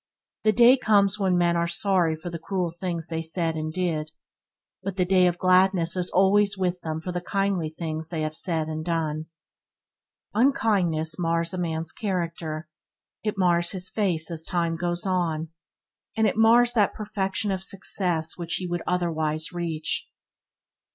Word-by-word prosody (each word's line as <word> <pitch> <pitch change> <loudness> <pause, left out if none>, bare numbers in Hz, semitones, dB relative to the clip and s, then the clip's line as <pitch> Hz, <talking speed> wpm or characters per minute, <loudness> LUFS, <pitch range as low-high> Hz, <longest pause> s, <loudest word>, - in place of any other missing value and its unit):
The 215 - +5
day 240 +4 +6
comes 205 -3 +3
when 190 -2 +2
men 175 -1 +2
are 170 0 +1
sorry 175 -2 +1
for 170 +2 -7
the 170 - -5
cruel 180 0 -2
things 170 -1 -4
they 165 -1 -2
said 165 0 -1
and 155 0 -3
did; 160 -3 -2 0.7
but 195 0 -4
the 180 - +2
day 185 0 +4
of 175 0 0
gladness 185 -1 +3
is 180 -1 -1
always 200 +2 +3
with 180 -1 -1
them 160 -1 -3
for 180 +3 -5
the 180 0 -3
kindly 195 -3 -1
things 160 0 -5
they 165 -3 -3
have 155 0 -3
said 160 -3 -1
and 155 0 -4
done. 160 -2 -2 1.1
Unkindness 190 - +1
mars 165 0 0
a - - -3
man's 160 -2 -2
character, 170 -5 -3 0.6
it 210 -2 -2
mars 175 -1 +2
his 185 -1 -2
face 175 -6 0
as 160 -1 -2
time 170 -1 0
goes 175 +2 -1
on, 165 -4 -1 0.7
and 220 - +3
it - - +1
mars 235 +2 +5
that 210 -4 +2
perfection 205 -1 -2
of 190 -1 -2
success 180 -4 -1
which 170 -1 -2
he 185 - -3
would 175 -1 -2
otherwise 160 -3 -1
reach. 165 -3 -3
175 Hz, 165 wpm, -25 LUFS, 165-190 Hz, 1.1 s, day